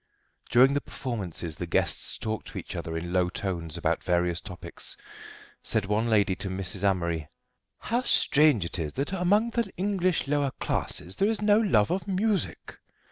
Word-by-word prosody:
During 130 Hz, +3 st, +6 dB
the 145 Hz, -, 0 dB
performances 90 Hz, -, -4 dB
the 90 Hz, -, -4 dB
guests -, -, 0 dB
talked 110 Hz, 0 st, -4 dB
to -, -, -8 dB
each -, -, -6 dB
other 80 Hz, 0 st, -4 dB
in 85 Hz, +2 st, -5 dB
low 90 Hz, -1 st, +2 dB
tones 85 Hz, -5 st, -4 dB
about -, -, 0 dB
various 90 Hz, -1 st, +1 dB
topics. 90 Hz, -3 st, -7 dB, 0.6 s
Said 110 Hz, -3 st, 0 dB
one 105 Hz, +3 st, 0 dB
lady 100 Hz, -3 st, +3 dB
to 100 Hz, -1 st, -4 dB
Mrs. 95 Hz, +1 st, -5 dB
Amory: 85 Hz, -5 st, 0 dB, 0.5 s
"How 240 Hz, +3 st, -1 dB
strange 150 Hz, -, +4 dB
it 85 Hz, -, -4 dB
is 75 Hz, -2 st, -3 dB
that 140 Hz, +7 st, -2 dB
among 205 Hz, +5 st, +2 dB
the 235 Hz, -1 st, 0 dB
English 185 Hz, -4 st, 0 dB
lower 145 Hz, -1 st, +1 dB
classes 90 Hz, -, 0 dB
there 200 Hz, -, +3 dB
is 225 Hz, -, 0 dB
no 210 Hz, 0 st, +5 dB
love 175 Hz, -, +3 dB
of 185 Hz, +1 st, -2 dB
music." 200 Hz, +1 st, -1 dB
110 Hz, 170 wpm, -27 LUFS, -, 0.6 s, During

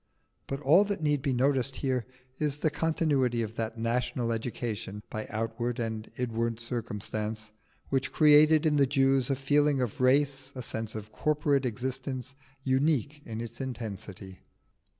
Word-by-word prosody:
But 135 Hz, +1 st, -4 dB
all 160 Hz, +8 st, +6 dB
that 200 Hz, -5 st, -3 dB
need 150 Hz, -2 st, +2 dB
be 140 Hz, 0 st, 0 dB
noticed 130 Hz, +1 st, +1 dB
here 130 Hz, -4 st, -1 dB, 0.3 s
is 150 Hz, -2 st, +1 dB
the 155 Hz, +1 st, +1 dB
continuity 145 Hz, -8 st, +1 dB
of 110 Hz, 0 st, -5 dB
that 115 Hz, 0 st, -3 dB
national 115 Hz, +1 st, -1 dB
education 110 Hz, -3 st, -4 dB
(by 110 Hz, 0 st, -4 dB
outward 115 Hz, +2 st, -2 dB
and 110 Hz, -1 st, -3 dB
inward 115 Hz, -2 st, -1 dB
circumstance) 110 Hz, -2 st, -4 dB, 0.4 s
which 135 Hz, 0 st, 0 dB
created 155 Hz, +1 st, +6 dB
in 150 Hz, -1 st, +3 dB
the 140 Hz, -1 st, +4 dB
Jews 135 Hz, -1 st, +2 dB
a 135 Hz, -, +2 dB
feeling 145 Hz, +1 st, +2 dB
of 125 Hz, -1 st, -2 dB
race, 135 Hz, +1 st, +2 dB
a 130 Hz, -, -5 dB
sense 110 Hz, -1 st, -4 dB
of 110 Hz, 0 st, -7 dB
corporate 145 Hz, 0 st, +1 dB
existence, 130 Hz, +2 st, -4 dB, 0.3 s
unique 140 Hz, +1 st, +1 dB
in 115 Hz, 0 st, -4 dB
its 115 Hz, +3 st, -7 dB
intensity. 100 Hz, -7 st, -6 dB
130 Hz, 150 wpm, -29 LUFS, 115-140 Hz, 0.4 s, all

